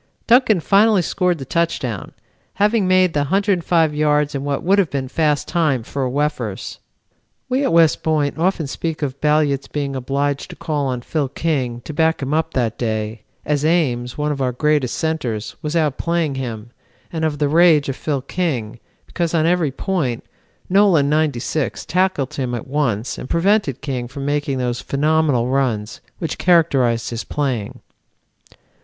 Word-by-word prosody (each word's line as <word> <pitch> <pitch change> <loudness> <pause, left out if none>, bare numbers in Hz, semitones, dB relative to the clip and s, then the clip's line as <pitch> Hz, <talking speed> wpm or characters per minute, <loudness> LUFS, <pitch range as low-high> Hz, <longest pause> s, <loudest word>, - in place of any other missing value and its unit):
Duncan 235 -5 +4
finally 205 +1 +4
scored 180 0 0
the 135 - -7
touchdown, 130 - -2 0.4
having 210 -1 +2
made 185 -2 +4
the 150 - +1
105 170 -1 +2
yards 150 -1 +1
in 140 -1 -3
what 140 -1 -2
would 195 +3 +3
have 185 -6 +2
been 135 -1 -3
fast 150 +1 0
time 150 -8 +1
for 140 +4 -5
a 130 - 0
Wefers. 145 +3 -3 0.7
"We 260 +2 +1
at - - +1
West 165 -2 +4
Point 150 -3 0
often 175 -2 +1
speak 155 +2 -4
of 140 -1 -4
Balliet's 150 -2 +2
being 140 -2 -3
obliged 140 +2 -2
to - - -9
call 145 -3 -2
on 125 -2 -2
Phil 145 -2 -1
King 130 -5 -2
to 155 - -8
back 160 +2 +2
him 135 +2 -2
up 160 +1 -1
that 115 -4 -1
day, 110 -1 -2 0.2
as 150 -1 0
Ames, 130 -7 +1
one 150 0 0
of 140 -2 -3
our 130 -1 +1
greatest 145 0 +1
centres, 125 -10 -2
was 150 0 -3
outplaying 160 0 0
him, 120 -3 -5 0.4
and 160 -1 -2
of 155 -2 0
the 145 0 +1
rage 160 -1 +5
of 135 - -2
Phil 140 -3 -2
King, 130 -10 -3 0.3
because 170 -1 -2
on 160 -1 +2
every 170 -3 +2
point, 135 - -2 0.4
Nolan, 180 -7 +4
'96, 150 -1 -1
tackled 180 -7 0
him 125 -3 -2
at 115 - -5
once 130 -6 -1
and 125 - -8
prevented 170 - +1
King 130 -4 -3
from 135 +2 -7
making 145 -1 -1
those 125 -1 -2
phenomenal 150 -3 +1
runs 120 -6 -1 0.2
which 165 - -4
characterized 135 -11 +2
his 115 -3 -4
playing." 125 -4 -3
150 Hz, 165 wpm, -20 LUFS, 130-165 Hz, 0.7 s, rage